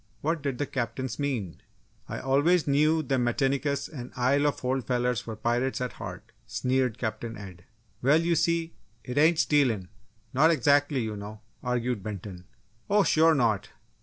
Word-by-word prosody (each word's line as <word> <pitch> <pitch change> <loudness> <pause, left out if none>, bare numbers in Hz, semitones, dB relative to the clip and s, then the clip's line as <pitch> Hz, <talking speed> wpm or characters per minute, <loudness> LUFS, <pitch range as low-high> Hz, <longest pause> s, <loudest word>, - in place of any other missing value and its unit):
What 160 +1 -1
did 140 -3 -2
the 145 - -1
Captains 120 -2 -4
mean? 120 - -3 0.5
"I - - -4
always 145 +6 +3
knew 155 +3 +3
them 130 -2 0
Metinicus 140 +3 0
an' 125 -6 -8
Isle 140 +4 +2
of 145 - -2
Holt 130 0 -1
fellers 125 -2 0
were 110 - -4
pirates 120 +4 0
at 125 -1 -3
heart!" - - -8 0.2
sneered 130 -2 0
Captain 115 0 -4
Ed. 90 -4 -11 0.4
"Well, 140 +5 +4
you 170 +1 +1
see, 170 0 0 0.3
it 125 +3 -2
ain't 160 +2 +5
stealin' 125 - +2 0.4
not 150 +5 +5
exactly, 145 -2 +3
you 110 -2 -3
know!" 105 +1 -8 0.2
argued 125 -2 -1
Benton. 95 -3 -7 0.4
"Oh 205 0 +4
sure 160 -1 +4
not! 110 -7 +1
130 Hz, 160 wpm, -27 LUFS, 115-145 Hz, 0.5 s, ain't